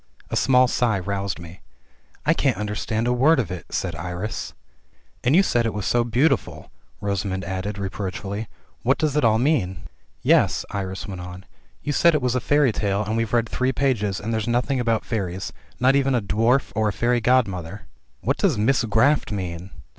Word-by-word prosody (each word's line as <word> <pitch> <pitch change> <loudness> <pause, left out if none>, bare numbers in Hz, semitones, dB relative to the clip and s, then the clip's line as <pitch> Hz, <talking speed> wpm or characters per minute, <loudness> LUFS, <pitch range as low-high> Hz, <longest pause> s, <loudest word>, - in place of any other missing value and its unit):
A - - -1
small 130 -1 +4
sigh 120 -4 +1
roused 100 0 -3
me 85 +2 -11 0.3
— - - -34
"I - - +4
can't - - +1
understand 105 +2 -2
a 125 - +2
word 135 +5 +4
of 105 -9 -2
it," 90 -4 -6
said 90 -3 -2
Iris. 90 +6 -5 0.7
"And 130 +5 +3
you 195 - +6
said 120 -10 +1
it 110 - -3
was 105 -2 -3
so 120 -1 +2
beautiful," 120 +7 0 0.3
Rosamund 100 -1 -2
added, 95 +2 -4
reproach 95 -1 -4
fully. 100 +3 -5 0.3
"What 130 +3 +2
does 150 -2 0
it 150 - +2
all 110 -1 +4
mean?" 115 - 0 0.4
"Yes," - - +3
Iris 95 -1 -4
went 95 -3 -6
on, 90 +1 -9 0.4
"you 145 - -1
said 170 +2 +4
it - - +1
was 125 -1 +1
a 125 - +1
fairy 145 -1 +3
tale, 100 -1 -1
and 110 +2 -2
we've 115 -1 -1
read 115 -1 +2
three 130 +3 0
pages, 105 -9 0
and 110 +2 -3
there's 110 -1 -1
nothing 125 +3 +1
about 115 -2 0
fairies, 95 -4 -3 0.3
not 130 +3 +4
even 135 -1 +2
a - - +3
dwarf, 115 +7 +1
or 110 -1 +2
a - - -3
fairy 120 +2 +1
god 125 +1 +4
mother." 90 +1 -6 0.4
"And 95 - -14
what 135 - +2
does 180 - +2
'misgraffed' 115 +4 +2
mean?" 90 -2 -4
110 Hz, 200 wpm, -23 LUFS, 95-125 Hz, 0.7 s, you